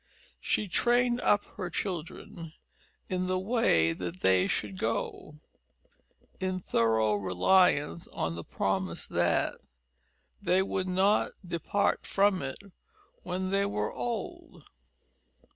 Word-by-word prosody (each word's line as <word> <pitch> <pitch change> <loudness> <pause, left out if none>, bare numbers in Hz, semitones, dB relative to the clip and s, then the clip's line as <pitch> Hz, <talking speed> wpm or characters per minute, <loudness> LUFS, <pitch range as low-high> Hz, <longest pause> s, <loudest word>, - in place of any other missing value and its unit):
She 210 - 0
trained 240 +5 +2
up 205 - +3
her 185 -3 -3
children 170 -3 -5 0.5
"in 185 0 -1
the 185 0 +1
way 185 - +2
that 90 +1 -6
they 95 0 +4
should 100 -2 -3
go," 150 - -3 1.0
in 185 -1 -1
thorough 110 -8 +2
reliance 145 - +2
on 80 - -3
the 85 0 -5
promise 95 -2 -2
that - - 0 0.8
"they 185 +1 +3
would 190 -1 -2
not 190 +3 +2
depart 170 +4 0
from 200 -1 +2
it 135 -1 -4 0.6
when 185 +1 -3
they 200 +1 +2
were 105 - -2
old." 345 +9 -5
180 Hz, 110 wpm, -29 LUFS, -, 1.0 s, they